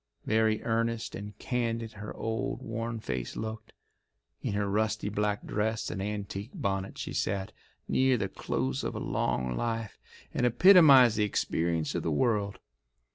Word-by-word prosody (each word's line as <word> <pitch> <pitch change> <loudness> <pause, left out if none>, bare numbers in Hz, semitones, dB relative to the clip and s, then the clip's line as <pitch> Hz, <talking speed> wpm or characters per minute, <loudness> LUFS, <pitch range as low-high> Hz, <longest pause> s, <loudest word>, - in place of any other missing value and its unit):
Very 110 0 +2
earnest 115 0 -1
and 105 +1 -7
candid 115 -2 -2
her 105 +1 -7
old, 115 +2 -3
worn 115 0 -3
face 60 - -4
looked. 110 0 -5 0.7
In - - -2
her 100 0 0
rusty 110 +1 0
black 105 0 -1
dress 110 +1 -1
and 95 - -4
antique 100 +1 -4
bonnet 95 -1 -2
she - - -5
sat, 95 0 -1 0.4
near 130 -1 +3
the 100 -3 -1
close 65 -7 -2
of - - -3
a - - -3
long 65 -1 -1
life, 115 - -3 0.3
and - - -1
epitomised 130 - +7
the 105 - +3
experience 85 -5 0
of - - -1
the - - -1
world. 100 - +1
110 Hz, 150 wpm, -29 LUFS, 100-115 Hz, 0.7 s, epitomised